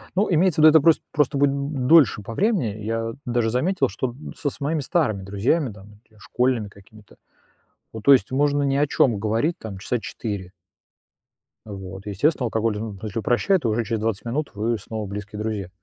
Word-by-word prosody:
Ну, 200 +3 +2
имеется 170 -1 +3
в - - +7
виду, - - +11
это 160 - +7
прос 165 +1 +5
просто 145 -2 +1
будет 140 0 +3
д 140 +1 -3
дольше 140 -9 +5
по 115 - -7
времени. 125 - 0
Я 115 +1 -2
даже 120 -2 0
заметил, 155 - +1
что 105 +6 -3
д 140 +5 -10
со 145 - -1
с - - -12
моими 155 +3 -1
старыми 135 - 0
друзьями 110 - 0
там 105 +1 -15
и 110 - -26
школьными 115 0 -1
какими-то, 100 +2 -18 0.8
ну, 110 - -5
то 140 +6 +6
есть 135 - +4
можно 145 +1 +2
ни 140 -1 +1
о 145 +1 +3
чём 120 -6 +2
говорить 115 +11 0
там 105 -4 -8
часа 120 +5 -2
4. 100 -5 -6 1.2
А 105 - -8
вот. 95 0 -8
Естественно, 125 - 0
алкоголь, 110 -1 -1
ну, 105 -2 -5
если 110 0 -4
упрощает, 155 - +1
уже 115 0 0
через 110 0 -2
20 110 -2 -2
минут 145 +6 -2
вы 110 +3 -1
снова 110 +1 -6
близкие 105 +1 -7
друзья. 105 -4 -3
115 Hz, 195 wpm, -23 LUFS, 105-145 Hz, 1.2 s, виду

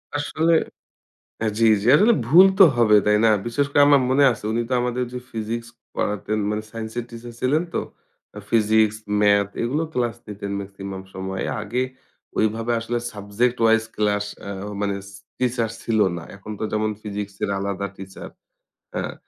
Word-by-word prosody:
আসলে 155 +3 +1 0.9
হ্যাঁ, 110 -1 0
জ্বি, 115 - +4 0.2
জ্বি। 115 - 0
আসলে 220 +6 +5
ভুল 175 +9 +8
তো 195 - +10
হবে, 110 -3 +5
তাই 105 - +5
না? 110 - +6 0.2
বিশেষ 140 +4 0
করে 145 - +3
আমার 140 -1 +6
মনে 140 +2 +4
আছে 115 -1 -10
উনি 120 +1 0
তো - - -1
আমাদের 125 +1 -1
যে 125 - -4
ফিজিক্স 115 +1 -4 0.3
পড়াতেন 105 +1 -1
মানে 105 0 -2
সাইন্স 110 -1 -6
এর 120 - -2
টিচার 120 +1 -9
ছিলেন 145 +6 +2
তো। - - +1 0.6
আ - - -6
ফিজিক্স, 110 -1 +3 0.2
ম্যাথ 100 -1 +4
এগুলো 140 +7 0
ক্লাস 120 -2 0
নিতেন 100 -1 -6
ম্যাক্সিমাম 95 -1 -7
সময়ে। 95 0 -4 0.2
আগে 120 +5 -1 0.6
ওইভাবে 110 +2 +1
আসলে 120 +1 -2
সাবজেক্ট 105 +4 -1
ওয়াইজ 115 0 +5
ক্লাস 105 -1 +1 0.2
আ - - -4 0.3
মানে 100 -1 0
ছি 100 - -14 0.2
টিচার 120 -3 0
ছিল 110 -2 0 0.2
না। 85 - -6
এখন 100 +2 -11
তো - - -3
যেমন 110 0 0
ফিজিক্স 100 -1 -5
এর - - -2
আলাদা 100 0 -2
টিচার 95 0 -9 0.7
হ্যাঁ, - - -3
110 Hz, 170 wpm, -23 LUFS, 105-120 Hz, 0.9 s, তো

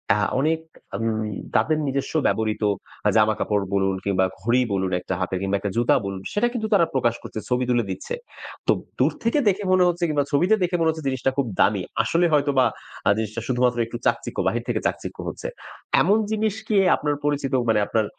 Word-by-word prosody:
আ - - +1 0.2
অনেক 160 +3 +1 0.4
আম 115 - -3 0.5
তাদের 155 -1 +3
নিজস্ব 135 0 -2
ব্যবহৃত 110 -1 0 0.4
আ - - +6
জামাকাপড় 105 -1 +2
বলুন, 95 -1 +1
কিংবা 95 -1 +2 0.2
ঘড়ি 120 +5 +2
বলুন 95 -1 0
একটা 90 - -4
হাতের, 95 0 -2
কিংবা 100 +1 0
একটা 100 0 -3
জুতা 120 0 +4
বলুন, 95 -1 -4
সেটা 210 +4 +2
কিন্তু 220 -3 -2
তারা 185 -5 +5
প্রকাশ 120 -3 +1
করছে, - - -6
ছবি 125 0 +1
তুলে 120 -1 +2
দিচ্ছে। 95 - -5 0.5
তো - - +6 0.3
দূর - - +4
থেকে 230 +6 +2
দেখে 200 +1 -1
মনে 185 -1 +5
হচ্ছে 175 0 -1
কিংবা 145 -2 +1
ছবিতে 175 +9 +4
দেখে 175 0 0
মনে 165 -1 +3
হচ্ছে 160 -2 -3
জিনিসটা 130 0 0
খুব 140 - +2
দামি। 100 -2 +3 0.2
আসলে 170 +10 +2
হয়তোবা 140 -3 +3 0.4
আ - - +6
জিনিসটা 110 +1 -3
শুধুমাত্র 125 -1 +1
একটু 115 +1 -6
চাকচিক্য - - 0
বাহির - - 0
থেকে - - 0
চাকচিক্য - - -5
হচ্ছে। - - -5 0.5
এমন 195 +9 +4
জিনিস 215 -1 0
কি 215 - +2 0.2
আপনার 145 -1 -1
পরিচিত 145 -2 -1 0.2
মানে 110 - +4
আপনার 110 -1 +1
130 Hz, 190 wpm, -23 LUFS, 105-160 Hz, 0.5 s, আ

